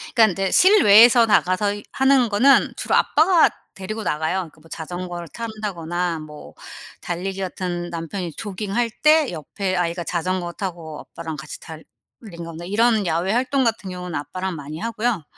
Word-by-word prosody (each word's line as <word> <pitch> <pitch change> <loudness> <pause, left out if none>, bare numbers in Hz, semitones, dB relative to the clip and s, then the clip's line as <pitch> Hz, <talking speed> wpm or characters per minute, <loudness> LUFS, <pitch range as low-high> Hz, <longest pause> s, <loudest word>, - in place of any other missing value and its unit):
그러니깐 225 -3 +6
이제 195 +1 -2
실외에서 240 - +7
나가서 205 -1 +2
이 205 - -8
하는 265 -2 +3
거는 250 +7 +4
주로 - - -1
아빠가 330 +2 +4 0.2
데리고 215 +3 -6
나가요. 160 +3 -1
그 155 - -22
뭐 165 - -19
자전거를 175 +1 -6
탄다거나 180 -6 -4
뭐 150 -1 -12 0.5
달리기 190 +2 -4
같은 175 -2 -4
남편이 170 +1 -5
조깅할 210 +3 -3
때 305 -1 +5
옆에 185 +4 -4
아이가 175 0 -1
자전거 175 0 -2
타고 170 -5 -6
아빠랑 160 -2 -8
같이 150 +1 -8
달리는 160 -1 -11 0.6
거나 165 0 -8
이런 215 +3 +2
야외 170 +4 0
활동 260 +3 +1
같은 225 -4 -2
경우는 180 -1 -7
아빠랑 185 +6 -4
많이 150 0 -8
하고요. 225 -4 -2
185 Hz, 355 characters per minute, -22 LUFS, 170-220 Hz, 0.6 s, 실외에서